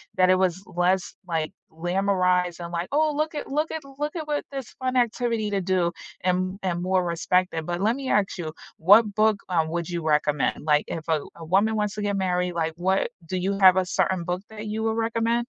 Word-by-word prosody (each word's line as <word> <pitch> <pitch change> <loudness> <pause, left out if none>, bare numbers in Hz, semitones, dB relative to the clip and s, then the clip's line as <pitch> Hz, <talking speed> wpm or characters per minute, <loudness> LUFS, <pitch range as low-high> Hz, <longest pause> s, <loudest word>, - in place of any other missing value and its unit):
that 185 0 +4
it 185 - +6
was 185 0 0
less, 180 +1 0
like, 160 -2 -1 0.2
glamorized 180 0 +1
and, 170 - -7
like, 170 +1 -2
'Oh, 310 +1 +3
look 305 +1 -1
at - - -4
look 300 +3 -1
at 320 - -4 0.2
look 300 +3 -2
at 310 -2 -4
what 295 -1 -1
this 270 -4 -5
fun 255 0 -1
activity 230 -2 +1
to 200 - +1
do,' 180 -2 +1 0.3
and 185 +1 0
and 175 -2 -1
more 185 0 +1
respect 180 +2 +1
it." 160 -1 -3
But 175 +1 -3
let 220 +4 +2
me 270 -2 -4
ask 200 -2 +1
you, 160 -3 -5 0.2
what 205 +5 +6
book, 215 -1 +3
um, 165 -3 +1
would 170 0 -3
you 170 -2 -3
recommend? 150 -1 +1
Like, 150 -1 +3
if 160 -1 -5
a 155 -2 +3
w - - -11
a 165 - -10
woman 200 +6 +2
wants 210 -1 -1
to 210 - -4
get 205 -1 0
married, 180 -1 0
like, 165 -1 -1
what 190 +4 +1 0.2
do 185 - -3
you 195 +2 -1
have 185 -1 +8
a 185 - +2
certain 180 0 0
book 180 +2 -2
that 215 0 -7
you 220 +1 -2
would 220 0 0
recommend? 230 +1 +1
185 Hz, 230 wpm, -25 LUFS, 175-220 Hz, 0.3 s, have